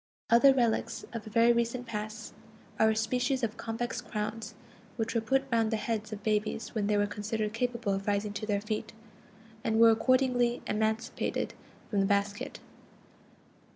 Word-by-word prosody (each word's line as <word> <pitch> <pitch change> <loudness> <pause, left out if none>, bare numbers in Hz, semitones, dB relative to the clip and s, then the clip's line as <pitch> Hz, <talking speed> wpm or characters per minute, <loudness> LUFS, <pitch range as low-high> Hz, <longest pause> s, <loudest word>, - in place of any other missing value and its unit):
Other 240 +4 +8
relics 235 -3 0
of 225 -2 -6
a - - -6
very 230 +2 +5
recent 235 +1 -1
past 215 0 -6 0.5
are 220 - +5
a 220 - +1
species 250 +4 0
of 225 -1 -1
convex 240 +2 -3
crowns 220 0 -4 0.4
which 225 -1 -2
were 230 - +1
put 270 +4 +2
round 225 -1 +3
the 220 - 0
heads 215 0 -3
of 210 -1 -6
babies 215 0 -1
when 210 -3 0
they 210 0 +2
were 205 - +3
considered 210 +1 -3
capable 235 -3 -1
of 195 +1 -3
rising 205 0 0
to 215 - -5
their 200 -2 0
feet, 215 0 -4 0.7
and 220 - +1
were 230 0 +8
accordingly 245 +1 +2
emancipated 220 +1 -1 0.4
from 205 - +1
the 195 - +3
basket. 200 0 -1
220 Hz, 165 wpm, -30 LUFS, 210-235 Hz, 0.7 s, Other